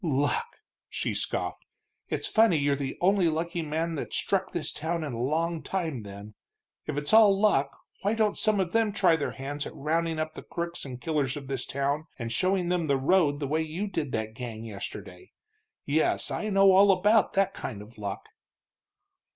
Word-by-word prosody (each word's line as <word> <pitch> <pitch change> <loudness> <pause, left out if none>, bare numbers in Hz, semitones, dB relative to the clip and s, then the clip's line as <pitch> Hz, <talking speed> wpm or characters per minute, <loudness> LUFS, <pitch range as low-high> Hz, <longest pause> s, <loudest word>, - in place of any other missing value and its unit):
"Luck!" 155 - 0 0.3
she - - -2
scoffed. - - -2 0.5
"It's - - -1
funny 220 -6 +4
you're 140 -1 +2
the 135 -1 -4
only 185 -1 +4
lucky 170 +2 -2
man 160 +2 -2
that's 150 - -4
struck 190 -1 0
this 170 - -2
town 165 +2 -3
in 145 -5 -4
a 115 - -4
long 160 +5 0
time, 165 -10 -3
then. 100 +1 -10 0.5
If - - -3
it's 145 +5 -1
all 210 -3 +7
luck, 145 -10 +2 0.2
why 205 +4 +1
don't 215 -2 +2
some 215 -2 +2
of 180 -3 0
them 225 -2 +2
try 165 - +4
their 145 -3 -2
hands 145 +2 -4
at - - -10
rounding 165 +2 -1
up 155 0 -2
the - - -8
crooks 170 -1 -5
and 125 -2 -7
killers 145 -2 -1
of 140 - -7
this 135 -2 -3
town 140 +3 -1
and 115 -2 -4
showing 185 +5 +1
them 175 -3 0
the 140 -1 +2
road 145 0 +3
the 145 - -2
way 155 +3 +1
you 160 +6 -3
did 160 -9 -3
that 110 0 -2
gang 115 -2 -6
yesterday? 110 - -8 0.5
Yes, 155 +2 +1
I 215 - -2
know 195 -1 +6
all 195 +1 +7
about 205 +3 +3
that 195 0 +2
kind 105 -5 -6
of 110 +1 -16
luck." 100 -1 -5
160 Hz, 190 wpm, -28 LUFS, 140-190 Hz, 0.5 s, all